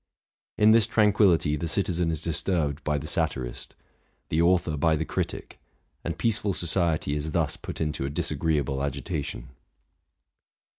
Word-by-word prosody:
In 105 Hz, +1 st, +6 dB
this 115 Hz, -1 st, +5 dB
tranquillity 100 Hz, -8 st, +3 dB
the 85 Hz, +3 st, -3 dB
citizen 90 Hz, -1 st, 0 dB
is 80 Hz, -3 st, -3 dB
dis 80 Hz, -3 st, 0 dB
turbed 80 Hz, -5 st, -1 dB
by 75 Hz, -1 st, 0 dB
the 70 Hz, -, -5 dB
satirist, 60 Hz, -5 st, -3 dB, 0.5 s
the 80 Hz, -, +1 dB
author 85 Hz, -2 st, +2 dB
by 80 Hz, +2 st, +2 dB
the 80 Hz, +1 st, -2 dB
critic; -, -, -4 dB, 0.4 s
and 85 Hz, -1 st, -4 dB
peaceful 105 Hz, 0 st, 0 dB
'society 85 Hz, -4 st, +1 dB
is 75 Hz, +1 st, -3 dB
thus -, -, +1 dB
put -, -, -8 dB
into 75 Hz, -3 st, -2 dB
a -, -, -2 dB
disagreeable 75 Hz, -3 st, -1 dB
agitation. 70 Hz, -2 st, -4 dB
80 Hz, 145 wpm, -26 LUFS, 75-90 Hz, 0.5 s, In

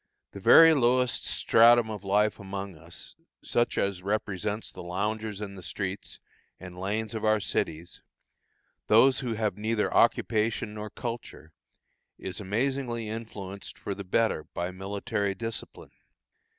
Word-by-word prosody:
The 100 Hz, -, -9 dB
very 165 Hz, +11 st, +8 dB
lowest 125 Hz, -2 st, +2 dB
stratum 115 Hz, 0 st, +5 dB
of 105 Hz, -2 st, -6 dB
life 105 Hz, +2 st, +2 dB
among 100 Hz, -1 st, -6 dB
us, 85 Hz, 0 st, -11 dB, 0.3 s
such 120 Hz, 0 st, 0 dB
as 100 Hz, -2 st, 0 dB
represents 105 Hz, +1 st, -2 dB
the -, -, -9 dB
loungers 105 Hz, +4 st, -3 dB
in 100 Hz, -2 st, -5 dB
the 95 Hz, -, -10 dB
streets 95 Hz, +2 st, -5 dB, 0.4 s
and 90 Hz, -1 st, -10 dB
lanes 105 Hz, +3 st, -2 dB
of 110 Hz, -, -4 dB
our 110 Hz, 0 st, +3 dB
cities, 85 Hz, -4 st, -3 dB, 0.9 s
those 130 Hz, +5 st, +5 dB
who 120 Hz, -4 st, -2 dB
have 105 Hz, -3 st, -2 dB
neither 110 Hz, 0 st, 0 dB
occupation 110 Hz, 0 st, +2 dB
nor 105 Hz, 0 st, -6 dB
culture, 115 Hz, -9 st, -7 dB, 0.6 s
is 95 Hz, +1 st, -5 dB
amazingly 120 Hz, +2 st, -2 dB
influenced 100 Hz, -3 st, -7 dB
for 100 Hz, -, -4 dB
the 100 Hz, -, -7 dB
better 100 Hz, -4 st, +1 dB
by 90 Hz, +1 st, -2 dB
military 100 Hz, +1 st, -3 dB
discipline. 115 Hz, +1 st, -5 dB
105 Hz, 135 wpm, -28 LUFS, 95-115 Hz, 0.9 s, very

